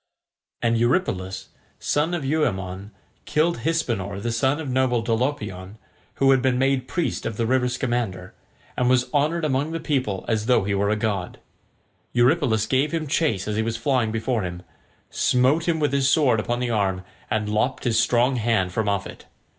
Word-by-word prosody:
And 115 -1 +2
Eurypylus, 115 - -1 0.3
son 155 +4 0
of 155 -5 -4
Euaemon, 100 - -1 0.4
killed 160 -1 +1
Hypsenor, 115 - -1
the 120 +3 -2
son 130 +6 +1
of 160 - -5
noble 125 -2 +1
Dolopion, 115 -5 -2 0.4
who 135 0 +4
had 135 -1 +4
been 130 -1 +1
made 135 -1 +1
priest 170 +6 -2
of 115 -2 -4
the 115 - 0
river 125 +1 +2
Scamander, 120 -8 -2 0.4
and 125 0 +1
was 125 +2 +2
honoured 155 +3 +1
among 145 +2 0
the 165 - -2
people 130 - -2
as 110 -1 -1
though 125 -5 +4
he 100 +1 -1
were 100 +1 +1
a 105 - +2
god. 105 -4 -3 0.7
Eurypylus 120 -3 +3
gave 135 +5 +1
him 165 -2 -2
chase 145 - 0
as 105 0 -2
he - - +2
was 115 0 -2
flying 120 -2 +1
before 115 +1 -1
him, 90 -1 -5 0.5
smote 135 +7 +2
him 165 -2 +1
with 145 -2 0
his 140 -1 +2
sword 135 -6 +3
upon 120 +3 -2
the 125 -1 -1
arm, 95 -4 0 0.3
and 110 -1 -1
lopped 110 +5 0
his 120 -3 +2
strong 125 +2 +2
hand 110 -5 +1
from 105 +3 -1
off 100 -1 -1
it. - - -11
120 Hz, 180 wpm, -23 LUFS, 105-135 Hz, 0.7 s, who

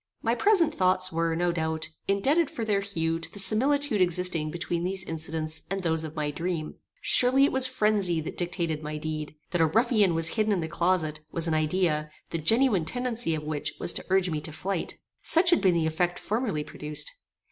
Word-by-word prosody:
My 230 - +2
present 350 - +4
thoughts 185 0 +2
were, 165 0 0
no 175 +1 +1
doubt, 160 -1 -2 0.2
indebted 275 +12 +2
for 230 - -4
their 205 -2 +1
hue 165 -4 -2
to 165 - -9
the - - -10
similitude 240 +4 +2
existing 175 -3 +2
between 170 +1 -3
these 190 +1 -2
incidents 160 -1 -3
and 195 +1 -2
those 160 -1 +1
of 155 0 -7
my 150 -1 -2
dream. 165 0 -3 0.3
Surely 255 +2 +4
it 280 - +3
was 260 0 +4
phrenzy 210 -8 +2
that 155 - -6
dictated 170 -3 -2
my 150 0 -5
deed. 155 0 -5 0.2
That 175 -1 +1
a 160 - +5
ruffian 215 -1 +2
was 165 0 +2
hidden 215 +1 +1
in 190 - 0
the 160 - -3
closet, 165 -2 0
was 165 0 -1
an 165 - 0
idea, 155 -1 0 0.2
the 165 - -2
genuine 220 - +2
tendency 240 -3 -1
of 155 - -5
which 150 -1 -3
was - - +2
to - - -6
urge 190 -1 +2
me 155 -1 -2
to 155 - -4
flight. 180 +4 -4 0.2
Such 345 +2 +5
had 345 - +4
been 185 -3 +3
the 165 -1 +1
effect 175 +2 0
formerly 215 -9 -2
produced. 150 - -4
175 Hz, 200 wpm, -27 LUFS, 160-210 Hz, 0.3 s, a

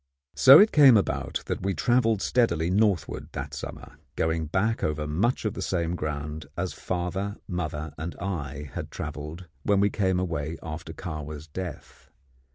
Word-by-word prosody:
So 135 +2 +9
it 210 +4 +7
came 135 -6 +8
about 100 - -1
that - - -3
we 95 0 -1
travelled 115 +4 +2
steadily 90 -9 +2
northward 100 -2 +1
that 70 +1 -5
summer, 70 - -8 0.2
going 80 0 0
back 100 +8 0
over 75 0 -1
much 100 +12 0
of 105 - 0
the - - -6
same 85 -2 -1
ground 75 -1 -4
as 90 +1 -2
father, 95 +3 -3
mother, 80 -5 -4
and 85 +2 -4
I 75 -7 -4
had - - -5
travelled 75 +4 -6 0.2
when 100 +5 +2
we 100 0 +3
came 95 -3 +1
away 80 -3 -2
after 80 0 -6
Kahwa's 75 -3 -6
death. 90 +2 -8
85 Hz, 160 wpm, -27 LUFS, 75-100 Hz, 0.2 s, So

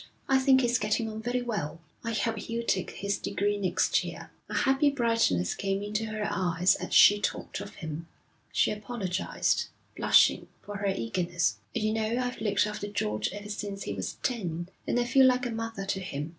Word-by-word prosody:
'I 265 -1 +4
think 265 0 +5
he's 245 0 +2
getting 215 +2 0
on 215 0 -6
very 245 +2 -1
well. 200 -10 -3 0.2
I 230 - -2
hope 225 +1 0
he'll 230 +2 -3
take 185 -5 0
his 200 0 -3
degree 205 +1 0
next 185 -3 +2
year.' - - -8 0.2
A - - -4
happy 275 +1 +3
brightness 230 - +1
came 195 0 -2
into 210 +2 -2
her 215 -1 -2
eyes 180 0 +2
as - - -5
she 205 0 +7
talked - - -2
of 200 0 -8
him. 160 0 -6 0.4
She - - +2
apologised, 205 -3 -1 0.3
blushing, - - +4 0.2
for 205 0 -6
her 200 0 -2
eagerness. 170 - 0 0.2
'You 215 0 +1
know, 220 +1 0
I've 250 -2 -2
looked 205 -2 +2
after 210 -1 -4
George 105 - -1
ever 205 +1 -8
since 205 -1 -4
he 100 - -3
was 95 -2 -4
ten, 175 -8 -2 0.2
and 245 - +1
I - - +3
feel 265 +2 +6
like 250 0 +2
a 240 - -2
mother 225 -3 -4
to 195 0 -1
him. 150 -5 -4
205 Hz, 190 wpm, -29 LUFS, 185-230 Hz, 0.4 s, she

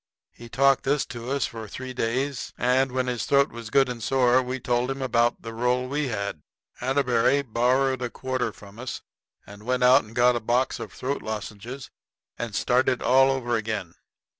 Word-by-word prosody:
He 120 - -13
talked 135 +2 +3
this 145 +2 +1
to 120 0 -7
us 140 0 0
for 110 -1 -7
three 130 +5 -7
days, 130 +3 -2
and 130 +2 +2
when 130 0 0
his 125 -4 -2
throat 140 0 +3
was 115 -2 -8
good 135 +1 +4
and 125 -2 -5
sore 130 +1 +3
we 130 +1 -4
told 120 +1 0
him 135 0 -3
about 120 -2 +1
the 115 -1 -6
roll 125 +2 0
we 145 +2 -1
had. 100 -8 -3 0.4
Atterbury 130 +1 +2
borrowed 130 +2 +1
a 125 - -2
quarter 130 -2 -2
from 100 +1 -14
us 130 0 -6 0.4
and 100 +1 -12
went 125 +3 0
out 130 +3 +6
and 110 +2 -14
got 125 0 +4
a - - 0
box 120 +3 0
of - - -7
throat 135 +2 -3
lozenges 110 +4 -6 0.4
and 115 -4 -5
started 125 +2 +2
all 135 +1 +5
over 125 -3 0
again. 105 -6 -3
125 Hz, 190 wpm, -25 LUFS, 115-130 Hz, 0.4 s, out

